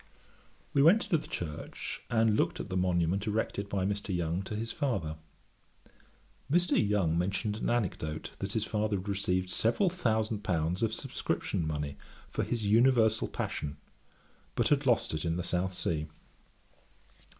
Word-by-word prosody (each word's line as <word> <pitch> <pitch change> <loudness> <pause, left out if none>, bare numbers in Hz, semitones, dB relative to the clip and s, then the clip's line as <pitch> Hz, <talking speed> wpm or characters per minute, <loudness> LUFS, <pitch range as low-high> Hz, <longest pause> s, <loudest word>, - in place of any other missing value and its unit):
We 140 - +4
went 175 +10 +6
into 165 - +1
the - - -10
church, 75 -4 -5
and 115 -2 +3
looked - - +1
at - - -5
the 95 - -3
monument 90 +2 +1
erected 105 -1 -1
by 95 -2 0
Mr. 100 0 -2
Young 85 +1 0
to 105 - -4
his 115 +2 -3
father. 100 - -1 1.4
Mr. 175 +3 +3
Young 100 -6 +3
mentioned 95 +4 0
an - - -1
anecdote, 85 -9 -1
that 95 0 -3
his 110 -1 0
father 105 -1 0
had 95 +2 -7
received 95 -2 0
several 170 - +2
thousand 110 - 0
pounds 85 -3 0
of 115 -1 +2
subscription 85 -6 -2
money 75 -2 -3 0.3
for - - -1
his 115 -3 -2
Universal 110 0 +4
Passion, 75 -1 -4 0.8
but - - +2
had 145 -1 +2
lost 120 -9 +3
it 80 - -2
in 85 0 0
the 90 - -2
South 90 +1 -1
Sea. 80 -3 -1
Dr. - - -25
100 Hz, 160 wpm, -31 LUFS, 90-110 Hz, 1.4 s, went